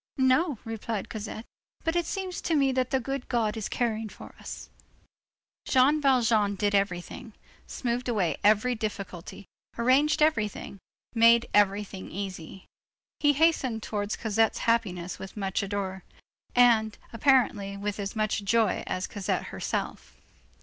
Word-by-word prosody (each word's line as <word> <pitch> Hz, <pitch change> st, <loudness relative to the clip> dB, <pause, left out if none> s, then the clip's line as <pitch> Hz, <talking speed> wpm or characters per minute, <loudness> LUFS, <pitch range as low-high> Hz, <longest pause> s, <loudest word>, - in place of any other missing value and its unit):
"No," 265 Hz, +3 st, +3 dB
replied 225 Hz, -2 st, -4 dB
Cosette, 220 Hz, +1 st, -6 dB, 0.4 s
"but 325 Hz, +1 st, 0 dB
it 345 Hz, -2 st, +1 dB
seems 380 Hz, -2 st, -4 dB
to 330 Hz, -, 0 dB
me 275 Hz, -2 st, +3 dB
that 255 Hz, -1 st, 0 dB
the 265 Hz, -, +1 dB
good 270 Hz, +1 st, -4 dB
God 225 Hz, -3 st, 0 dB
is 220 Hz, -3 st, -4 dB
caring 225 Hz, -2 st, -1 dB
for -, -, -12 dB
us." -, -, -8 dB, 1.0 s
Jean 280 Hz, +4 st, +4 dB
Valjean 230 Hz, -7 st, +3 dB
did 205 Hz, +1 st, 0 dB
everything, 195 Hz, +2 st, -2 dB, 0.3 s
smoothed 245 Hz, 0 st, -2 dB
away 185 Hz, -10 st, 0 dB
every 215 Hz, +4 st, +4 dB
difficulty, 200 Hz, -5 st, -6 dB, 0.3 s
arranged 270 Hz, +6 st, +3 dB
everything, 210 Hz, -9 st, -1 dB, 0.3 s
made 230 Hz, 0 st, +5 dB
everything 200 Hz, -1 st, +1 dB
easy. 190 Hz, -2 st, -7 dB, 0.5 s
He 290 Hz, -1 st, +4 dB
hastened 275 Hz, -7 st, +2 dB
towards 205 Hz, -1 st, -2 dB
Cosette's 225 Hz, 0 st, +1 dB
happiness 185 Hz, -7 st, 0 dB
with 190 Hz, -, -8 dB
as -, -, -18 dB
much 195 Hz, -2 st, -1 dB
ardor, 195 Hz, -1 st, -3 dB, 0.5 s
and, 230 Hz, -3 st, +4 dB, 0.2 s
apparently 225 Hz, -6 st, +2 dB
with 205 Hz, +1 st, -4 dB
as 200 Hz, +1 st, -4 dB
much 215 Hz, -1 st, 0 dB
joy, 225 Hz, +2 st, +2 dB
as 185 Hz, 0 st, -2 dB
Cosette 200 Hz, -3 st, -2 dB
herself. -, -, -4 dB
220 Hz, 135 wpm, -27 LUFS, 200-255 Hz, 1.0 s, made